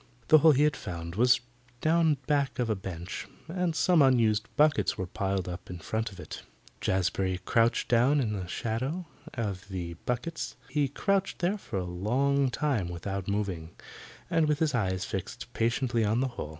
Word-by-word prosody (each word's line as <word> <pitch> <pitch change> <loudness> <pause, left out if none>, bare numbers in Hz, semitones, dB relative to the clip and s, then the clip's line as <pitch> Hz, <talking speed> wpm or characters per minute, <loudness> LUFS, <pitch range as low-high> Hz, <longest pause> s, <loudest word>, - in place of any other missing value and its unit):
The 155 - +8
hole 155 0 +7
he 140 +2 +3
had 150 -3 +3
found 85 -5 -6
was 120 +5 +4 0.4
down 160 0 +3
back 140 -2 +1
of 120 -3 0
a - - +1
bench, 95 -2 -6 0.2
and 175 -1 -1
some 175 -1 +4
unused 115 -5 +3
buckets 150 0 +3
were 95 - -2
piled 95 0 -2
up 90 0 -7
in 90 - -5
front 110 +6 -3
of 95 - -12
it. - - -7 0.4
Jazbury 95 0 0
crouched 115 0 +2
down 125 +5 +4
in 110 -6 0
the 95 -3 -4
shadow 130 - -2 0.3
of 100 -5 -3
the 90 -3 -4
buckets. 125 +7 -3
He 145 -2 +1
crouched 195 +8 0
there 185 +4 0
for 105 - -5
a 90 - -1
long 130 +10 +1
time 125 -9 0
without 95 +2 -4
moving, 95 -5 -3 0.5
and 160 -2 +2
with 150 -1 +2
his 155 -2 +1
eyes 95 -5 0
fixed 95 -2 -6
patiently 120 0 +1
on 110 +3 +2
the 130 0 +1
hole. 120 -10 -6
115 Hz, 175 wpm, -29 LUFS, 95-145 Hz, 0.5 s, The